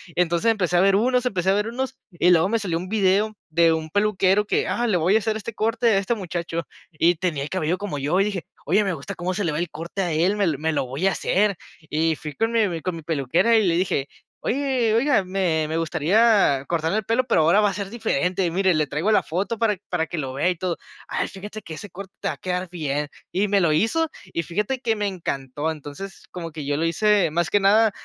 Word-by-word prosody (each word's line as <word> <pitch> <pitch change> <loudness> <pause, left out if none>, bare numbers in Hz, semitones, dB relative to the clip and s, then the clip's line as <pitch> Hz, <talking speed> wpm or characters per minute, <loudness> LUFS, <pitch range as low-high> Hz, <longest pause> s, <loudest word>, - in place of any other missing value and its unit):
Entonces, 175 +5 +2
empecé 180 -5 +1
a 175 - +5
ver 195 0 +4
unos 250 +4 +2
empecé 190 -6 0
a - - +5
ver 210 +2 0
unos. 260 +3 -4
Y 180 -1 +1
luego, 170 0 +5
me 230 - +2
salió 180 -6 -1
un 180 +2 -5
video 210 +1 +2
de 165 0 +4
un 160 0 -3
peluquero, 205 +1 +2
que: - - 0
"Ah, 240 0 0
le 210 - +1
voy 175 +5 +2
a - - +5
hacer 220 0 -1
este 220 +1 -5
corte 230 +2 0
a 210 - +4
este 200 +4 0
muchacho". 170 -4 -4 0.3
Y 170 +2 +3
tenía 155 -5 -2
el 150 - -6
cabello 180 -1 -1
como 205 -7 -4
yo, 150 +7 +1
y 195 - +5
dije: 200 -4 -3 0.2
"Oye, 200 +6 +3
me 190 - 0
gusta 160 +6 -6
cómo 180 +1 -2
se 200 +2 -2
le 165 - 0
ve 150 - -2
el 175 -1 -2
corte 170 +5 -5
a 175 - -1
él. 180 +7 +2
Me 200 - +2
me 160 +2 -1
lo 140 - 0
voy 135 +9 -3
a 195 - +3
hacer". 200 +1 +1 0.3
Y 160 +1 +1
fui 150 0 -7
con 225 +9 0
mi 225 -2 +4
mi 165 -2 -4
con 185 -2 -3
mi 165 - -7
peluquera, 165 - +2
y 215 -4 +3
le 165 - +2
dije: 170 -6 0 0.4
"Oye, 255 -4 +1
oiga, 250 -3 +3
me 180 -5 0
me 160 - -2
gustaría 165 - +3
cortarme 165 +3 0
el 220 - -1
pelo, 235 +3 +1
pero 230 -9 +3
ahora 170 +6 +4
va 205 - +3
a 195 - -4
ser 200 -1 -4
diferente. 185 -5 0
Mire, 185 +1 +2
le 155 -2 +1
traigo 165 +10 0
la - - +4
foto, 195 +7 -2
para 215 -3 +2
para 165 -2 -1
que 175 - -5
lo 135 -3 -3
vea 150 +7 +1
y 180 - 0
todo". 175 -1 -2 0.3
"Ay, - - -1
fíjate 205 +3 -8
que 160 - -8
ese 205 +5 -9
corte, 190 +1 -9
te - - -2
va - - -3
a - - -25
quedar 180 0 -3
bien". 150 -4 -2 0.2
Y 195 +3 +1
me 200 -1 +2
lo 165 - +3
hizo, 310 - +1 0.2
y 170 - 0
fíjate, 210 +10 -2
que 225 -3 +1
me 210 -1 -2
encantó. 145 -5 -3
Entonces, 155 +6 -8
como 170 -2 -6
que 150 -2 -7
yo 145 0 0
lo 165 - 0
hice, 205 +2 +3
más 170 +1 0
que 205 - +4
nada, 210 +3 +4
185 Hz, 255 wpm, -23 LUFS, 165-210 Hz, 0.4 s, a